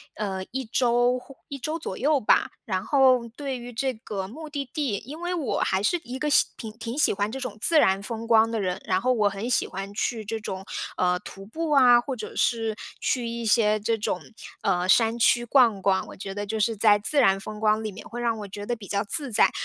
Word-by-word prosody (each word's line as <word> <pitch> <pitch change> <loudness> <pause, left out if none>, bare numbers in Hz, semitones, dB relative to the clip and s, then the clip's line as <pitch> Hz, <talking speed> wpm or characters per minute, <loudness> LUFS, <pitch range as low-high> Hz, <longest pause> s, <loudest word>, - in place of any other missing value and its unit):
呃， 190 -3 -3
1 265 0 -3
周 245 +2 +2
或 270 +2 -12
1 280 - -6
周 310 +5 -3
左 195 - -5
右 290 +2 +2
吧。 210 - +3 0.2
然 185 -3 -1
后 255 -4 +4
对 275 -2 -4
于 245 0 -9
这 260 +2 -1
个 210 -3 -5
目 310 +6 -9
的 285 -1 -3
地 275 -9 -1
因 300 +5 -8
为 350 +1 -2
我 310 -7 -1
还 190 +1 0
是 350 +10 +2
一 250 -1 -7
个 300 +2 -1 0.3
挺 220 -3 -7
挺 230 +3 -5
喜 305 - +3
欢 205 +1 -1
这 265 - -5
种 250 -6 -5
自 320 +7 +3
然 190 -6 +3
风 230 0 -5
光 225 -1 +5
的 225 - -1
人， 185 -1 -2
然 185 0 +1
后 255 +3 +2
我 210 -4 +2
很 200 +5 -5
喜 - - +2
欢 195 +1 -6
去 220 +1 -2
这 225 +2 -3
种， 190 -2 -6 0.3
呃， 180 0 +2
徒 195 +2 -11
步 315 +8 -4
啊， 250 -4 +7
或 265 +1 -4
者 - - -8
是 225 -2 +1 0.3
去 240 -2 0
一 235 0 -4
些 215 -1 +3
这 225 +1 0
种， 205 -4 -2 0.4
呃， 180 -1 +1
山 225 +2 +4
区 240 +1 +4
逛 230 -6 +4
逛， 190 -1 +1
我 - - -10
觉 195 0 -6
得 205 0 -4
就 220 +2 -3
是 225 +2 +1
在 205 0 +5
自 285 +8 +1
然 195 -7 +5
风 210 +2 -8
光 215 0 +2
里 215 - -3
面， 190 - -11
会 240 +1 -6
让 230 -2 0
我 205 - -6
觉 205 +1 -7
得 240 - -1
比 200 -3 -11
较 200 0 0
自 275 +7 -1
在。 225 - +4
225 Hz, 250 characters per minute, -25 LUFS, 205-255 Hz, 0.4 s, 啊